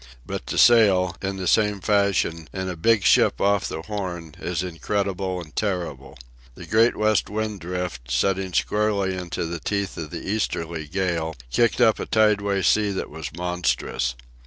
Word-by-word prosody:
But -, -, -6 dB
to -, -, -3 dB
sail, 95 Hz, -7 st, +5 dB
in 95 Hz, 0 st, -3 dB
the 95 Hz, -, -4 dB
same 105 Hz, +2 st, +2 dB
fashion, 100 Hz, -5 st, +1 dB
in 95 Hz, -1 st, -4 dB
a 90 Hz, -, -4 dB
big 105 Hz, +5 st, +2 dB
ship -, -, +4 dB
off 100 Hz, -1 st, +2 dB
the 80 Hz, -, -5 dB
Horn, 90 Hz, -6 st, -5 dB
is 90 Hz, 0 st, -2 dB
incredible 95 Hz, +1 st, -2 dB
and 75 Hz, -4 st, -11 dB
terrible. 85 Hz, -10 st, -3 dB, 0.4 s
The -, -, -10 dB
Great 115 Hz, +2 st, +3 dB
West 110 Hz, -1 st, +2 dB
Wind 105 Hz, -1 st, -3 dB
Drift, 90 Hz, -8 st, -5 dB
setting 95 Hz, +9 st, 0 dB
squarely 100 Hz, -1 st, 0 dB
into 90 Hz, -2 st, -4 dB
the 85 Hz, +1 st, -4 dB
teeth 100 Hz, +3 st, -2 dB
of 80 Hz, -2 st, -5 dB
the 85 Hz, 0 st, -7 dB
easterly 85 Hz, -6 st, -2 dB
gale, 85 Hz, -2 st, -1 dB, 0.2 s
kicked 115 Hz, -, +2 dB
up 115 Hz, -3 st, +4 dB
a -, -, -4 dB
tideway 100 Hz, -3 st, +2 dB
sea 105 Hz, -1 st, +3 dB
that 95 Hz, -, -4 dB
was 80 Hz, -4 st, -6 dB
monstrous. 90 Hz, -8 st, -1 dB
95 Hz, 165 wpm, -24 LUFS, 85-105 Hz, 0.4 s, sail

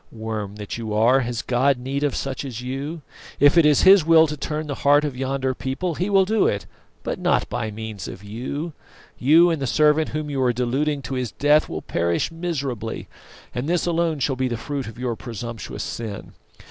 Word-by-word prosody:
Worm 110 Hz, -3 st, -5 dB
that 105 Hz, +2 st, -6 dB
you 110 Hz, -2 st, -3 dB
are, 120 Hz, +5 st, +5 dB
has 120 Hz, -2 st, -3 dB
God 130 Hz, +2 st, +2 dB
need 135 Hz, +3 st, -3 dB
of 145 Hz, -3 st, 0 dB
such 135 Hz, 0 st, -3 dB
as 125 Hz, -5 st, -6 dB
you? 140 Hz, +5 st, -5 dB, 0.4 s
If 145 Hz, +3 st, +6 dB
it 165 Hz, -3 st, +6 dB
is 150 Hz, -2 st, +4 dB
His 190 Hz, -2 st, +8 dB
will 160 Hz, 0 st, +6 dB
to 150 Hz, -1 st, -4 dB
turn 150 Hz, +2 st, -3 dB
the 145 Hz, -, -3 dB
heart 145 Hz, +1 st, +5 dB
of 145 Hz, -3 st, -3 dB
yonder 135 Hz, 0 st, -1 dB
people 135 Hz, +8 st, -3 dB
He 180 Hz, +6 st, -2 dB
will 195 Hz, -1 st, +4 dB
do 215 Hz, +1 st, +2 dB
it, 100 Hz, -, -1 dB, 0.4 s
but -, -, -3 dB
not -, -, +1 dB
by 110 Hz, -, -2 dB
means 110 Hz, -1 st, -6 dB
of 95 Hz, -, -9 dB
you. 130 Hz, +10 st, -5 dB, 0.5 s
You 165 Hz, +7 st, +6 dB
and 160 Hz, -4 st, -2 dB
the 135 Hz, -, -1 dB
servant 150 Hz, +3 st, +3 dB
whom 155 Hz, 0 st, -3 dB
you 140 Hz, -2 st, -2 dB
are 125 Hz, -1 st, +3 dB
deluding 135 Hz, +4 st, -1 dB
to 120 Hz, -, -5 dB
his 125 Hz, -3 st, -3 dB
death 150 Hz, +2 st, +3 dB
will -, -, -5 dB
perish 85 Hz, -, 0 dB
miserably, 140 Hz, -10 st, -4 dB, 0.4 s
and 125 Hz, +5 st, -3 dB
this 175 Hz, -1 st, +1 dB
alone 170 Hz, -2 st, +1 dB
shall 135 Hz, 0 st, 0 dB
be 130 Hz, 0 st, 0 dB
the 120 Hz, -2 st, -2 dB
fruit 135 Hz, +1 st, -4 dB
of 115 Hz, -, -9 dB
your 125 Hz, -2 st, -2 dB
presumptuous 115 Hz, -1 st, -6 dB
sin. 110 Hz, -4 st, -6 dB
135 Hz, 210 wpm, -23 LUFS, 120-150 Hz, 0.5 s, His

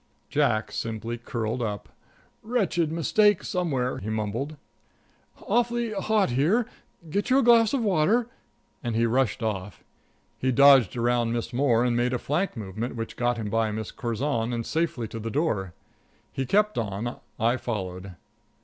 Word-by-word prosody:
Jack 110 Hz, 0 st, +1 dB
simply 115 Hz, +1 st, -4 dB
curled 115 Hz, 0 st, -3 dB
up: 105 Hz, -3 st, -3 dB, 0.5 s
"Wretched 190 Hz, -9 st, 0 dB
mistake 205 Hz, +5 st, +3 dB
somewhere," 145 Hz, -10 st, -1 dB
he 105 Hz, -, -5 dB
mumbled. 110 Hz, +7 st, -3 dB, 0.9 s
"Awfully 235 Hz, +1 st, +1 dB
hot 205 Hz, -, +1 dB
here 165 Hz, -, +2 dB, 0.5 s
get 200 Hz, +4 st, -1 dB
you 260 Hz, -, +5 dB
a 275 Hz, -, +4 dB
glass 230 Hz, -2 st, +6 dB
of 270 Hz, -4 st, 0 dB
water," 205 Hz, +5 st, +3 dB, 0.6 s
and 120 Hz, -3 st, -2 dB
he 115 Hz, +1 st, +3 dB
rushed 120 Hz, 0 st, +1 dB
off. 105 Hz, -2 st, -4 dB, 0.6 s
He 130 Hz, -, +1 dB
dodged 135 Hz, -4 st, +6 dB
around 120 Hz, -1 st, +1 dB
Miss 120 Hz, +1 st, -3 dB
Moore, 125 Hz, -2 st, +3 dB
and 120 Hz, -1 st, +1 dB
made 120 Hz, +1 st, +1 dB
a -, -, +1 dB
flank 150 Hz, +5 st, -2 dB
movement 110 Hz, +4 st, -5 dB
which 115 Hz, -1 st, -5 dB
got 120 Hz, 0 st, 0 dB
him 105 Hz, -2 st, -4 dB
by 115 Hz, -1 st, +1 dB
Miss 110 Hz, 0 st, -4 dB
Curzon 120 Hz, 0 st, -2 dB
and 115 Hz, -1 st, -3 dB
safely 155 Hz, -8 st, -1 dB
to 115 Hz, -, -7 dB
the 115 Hz, +1 st, -4 dB
door. 110 Hz, -, -1 dB, 0.6 s
He 135 Hz, -1 st, -2 dB
kept 210 Hz, -, +2 dB
on; 110 Hz, +2 st, -3 dB, 0.2 s
I 115 Hz, +3 st, +2 dB
followed. 95 Hz, -6 st, -5 dB
120 Hz, 155 wpm, -26 LUFS, 115-170 Hz, 0.9 s, glass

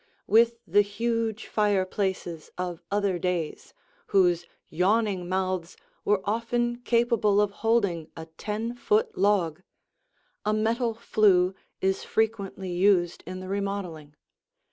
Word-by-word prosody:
With 230 Hz, +1 st, +4 dB
the 205 Hz, -, +4 dB
huge 225 Hz, +1 st, -2 dB
fireplaces 190 Hz, -5 st, -1 dB
of 180 Hz, -1 st, -4 dB
other 200 Hz, -3 st, 0 dB
days, 175 Hz, -3 st, -3 dB, 0.3 s
whose 175 Hz, -3 st, +3 dB, 0.2 s
yawning 190 Hz, 0 st, +1 dB
mouths 185 Hz, -2 st, -2 dB, 0.3 s
were 205 Hz, -2 st, +2 dB
often 240 Hz, +3 st, -1 dB
capable 235 Hz, -4 st, +2 dB
of 210 Hz, -1 st, +2 dB
holding 200 Hz, -7 st, 0 dB
a 160 Hz, -, -6 dB
ten 210 Hz, +8 st, -4 dB
foot 435 Hz, -, +1 dB
log, 185 Hz, -5 st, +1 dB, 0.8 s
a 210 Hz, +1 st, +1 dB
metal 225 Hz, +2 st, 0 dB
flue 195 Hz, -5 st, +3 dB, 0.3 s
is 190 Hz, 0 st, 0 dB
frequently 200 Hz, -4 st, -1 dB
used 175 Hz, -1 st, +2 dB
in 185 Hz, +1 st, -6 dB
the 185 Hz, -, -7 dB
remodeling. 190 Hz, -7 st, -4 dB
200 Hz, 115 wpm, -27 LUFS, 180-225 Hz, 0.8 s, With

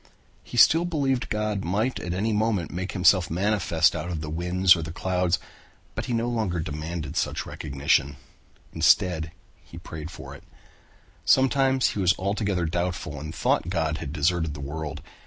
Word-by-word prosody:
He 120 Hz, -, -8 dB
still 165 Hz, +8 st, +6 dB
believed 140 Hz, -7 st, 0 dB
that -, -, -6 dB
God 105 Hz, -2 st, -1 dB
might 105 Hz, +8 st, -1 dB
at 85 Hz, -, -5 dB
any 105 Hz, +5 st, 0 dB
moment 105 Hz, -5 st, 0 dB
make 90 Hz, +2 st, -4 dB
himself 90 Hz, -1 st, +4 dB
manifest 85 Hz, -3 st, +2 dB
out 85 Hz, -, -4 dB
of 85 Hz, -3 st, -3 dB
the 75 Hz, -1 st, -5 dB
winds 90 Hz, +3 st, +4 dB
or 85 Hz, -, -4 dB
the 80 Hz, 0 st, -5 dB
clouds, 90 Hz, 0 st, 0 dB, 0.6 s
but -, -, -4 dB
he 125 Hz, -, -2 dB
no 115 Hz, +1 st, 0 dB
longer 110 Hz, -8 st, -1 dB
demanded 80 Hz, 0 st, -5 dB
such -, -, -1 dB
recognition. 70 Hz, -1 st, 0 dB, 0.6 s
Instead 90 Hz, -5 st, +2 dB, 0.3 s
he -, -, -13 dB
prayed 80 Hz, 0 st, -8 dB
for 90 Hz, -, -10 dB
it. -, -, -12 dB, 0.8 s
Sometimes 135 Hz, 0 st, +3 dB
he -, -, -4 dB
was 95 Hz, -1 st, +3 dB
altogether 100 Hz, -2 st, -1 dB
doubtful 85 Hz, -3 st, -3 dB
and 75 Hz, +3 st, -7 dB
thought 85 Hz, -, +1 dB
God 80 Hz, -3 st, -1 dB
had 70 Hz, -, -5 dB
deserted 80 Hz, 0 st, 0 dB
the -, -, -8 dB
world. 75 Hz, +1 st, -5 dB
90 Hz, 170 wpm, -25 LUFS, 80-105 Hz, 0.8 s, still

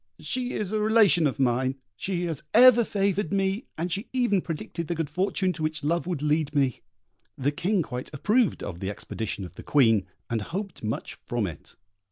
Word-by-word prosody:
She 255 Hz, -1 st, -1 dB
is 210 Hz, -2 st, -3 dB
a 215 Hz, -, 0 dB
relation 210 Hz, -7 st, +5 dB
of 135 Hz, -, -3 dB
mine; 130 Hz, +1 st, +1 dB, 0.2 s
she 180 Hz, -, -2 dB
has 160 Hz, -4 st, -3 dB
ever 240 Hz, 0 st, +8 dB
favoured 200 Hz, -4 st, 0 dB
me, 195 Hz, +3 st, 0 dB
and 175 Hz, +3 st, -2 dB
she 200 Hz, +7 st, -2 dB
even 240 Hz, -7 st, +2 dB
predicted 165 Hz, 0 st, -5 dB
the 170 Hz, -, -1 dB
good 160 Hz, -3 st, -3 dB
fortune 185 Hz, +2 st, 0 dB
to 165 Hz, -, -8 dB
which 155 Hz, -1 st, -2 dB
love 170 Hz, +3 st, 0 dB
would 170 Hz, -5 st, -2 dB
lead 150 Hz, -1 st, +1 dB
me." 135 Hz, -4 st, +1 dB, 0.6 s
The 140 Hz, +2 st, +1 dB
King 180 Hz, +5 st, 0 dB
quite 125 Hz, -3 st, -6 dB
approved 210 Hz, -, +1 dB
of 85 Hz, -3 st, -6 dB
the 95 Hz, -, -3 dB
expedition 105 Hz, -1 st, -4 dB
of 90 Hz, -, -11 dB
the -, -, -10 dB
Queen, 115 Hz, -9 st, +3 dB, 0.2 s
and 115 Hz, -2 st, -1 dB
hoped 190 Hz, -, -5 dB
much 110 Hz, +1 st, -4 dB
from 120 Hz, -3 st, 0 dB
it. 85 Hz, -6 st, -8 dB
165 Hz, 195 wpm, -26 LUFS, 130-200 Hz, 0.6 s, ever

